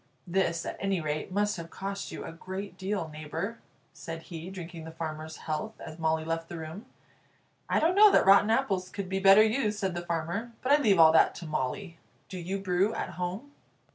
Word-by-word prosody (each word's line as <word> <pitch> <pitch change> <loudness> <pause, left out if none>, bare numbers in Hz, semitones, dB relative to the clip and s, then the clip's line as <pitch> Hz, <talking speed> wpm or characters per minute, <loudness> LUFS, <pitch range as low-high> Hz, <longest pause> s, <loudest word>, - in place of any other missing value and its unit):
"This, 175 -2 0
at - - -5
any 195 -2 0
rate, 155 +2 -3
must 205 +1 +1
have 165 0 -7
cost 195 +2 -5
you - - -6
a - - -6
great 190 +3 -7
deal, 190 -2 -2
neighbour," 155 +9 -5 0.3
said 165 0 -7
he, 170 0 -8
drinking 175 -3 -8
the 160 - -8
farmer's 160 -1 -6
health 160 +8 -4
as 155 +1 -9
Molly 160 0 0
left 165 0 -3
the 170 - -6
room. 165 +9 -8 0.8
"I - - +3
don't 330 +3 +3
know 420 +2 +8
that - - +4
rotten 195 +2 +6
apples 200 -6 +1
could 195 -2 -5
be 190 0 -1
better 195 +2 +8
used," 220 -1 +1
said 195 -3 -1
the 175 - -3
farmer; 175 +7 -3
"but 255 - +1
I 295 +1 +6
leave 205 -8 +4
all 160 -1 +8
that 160 - +4
to 175 - -8
Molly. 160 +4 -3 0.3
Do 185 - -6
you 185 +3 -3
brew 195 +2 +1
at - - -3
home?" 185 +10 -5
185 Hz, 205 wpm, -29 LUFS, 165-200 Hz, 0.8 s, know